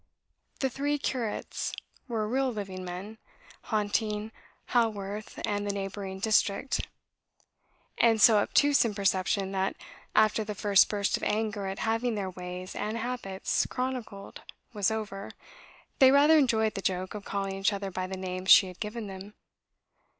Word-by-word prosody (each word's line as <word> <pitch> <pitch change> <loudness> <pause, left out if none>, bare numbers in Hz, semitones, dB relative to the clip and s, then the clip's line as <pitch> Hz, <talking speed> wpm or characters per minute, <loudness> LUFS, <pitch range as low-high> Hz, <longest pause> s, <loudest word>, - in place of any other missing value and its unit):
The 265 - +2
"three 290 +3 -1
curates" 250 -6 -3 0.3
were 220 -4 -1
real 260 +3 +1
living 195 -4 -6
men, 185 +5 -7 0.5
haunting 210 0 -1 0.4
Haworth 210 -3 -1
and 205 0 -1
the - - +1
neighbouring 195 -1 -5
district; 215 +4 +1 1.1
and 225 -2 +4
so 215 -1 +7
obtuse 285 +7 +4
in 225 -3 -2
perception 195 0 +1
that, 190 0 -1 0.4
after 215 0 +4
the 210 0 -5
first 200 -1 +4
burst 205 -1 0
of - - -11
anger 210 -2 -1
at 190 +1 -4
having 225 +1 0
their 195 -2 -3
ways 180 +1 -7
and 215 +2 -3
habits 230 -5 -2
chronicled 250 -6 -5 0.3
was 205 -3 +1
over, 210 -3 -4 0.7
they 265 - +8
rather 285 +4 +6
enjoyed 220 -5 +2
the 195 - -4
joke 185 -1 -2
of 210 -1 -7
calling 195 -1 -3
each 195 +2 +2
other 200 -1 -4
by 185 0 -3
the 190 0 -5
names 185 0 -4
she 195 - +9
had 180 -1 -10
given 220 +1 -4
them. 195 +1 -9
210 Hz, 150 wpm, -29 LUFS, 195-225 Hz, 1.1 s, she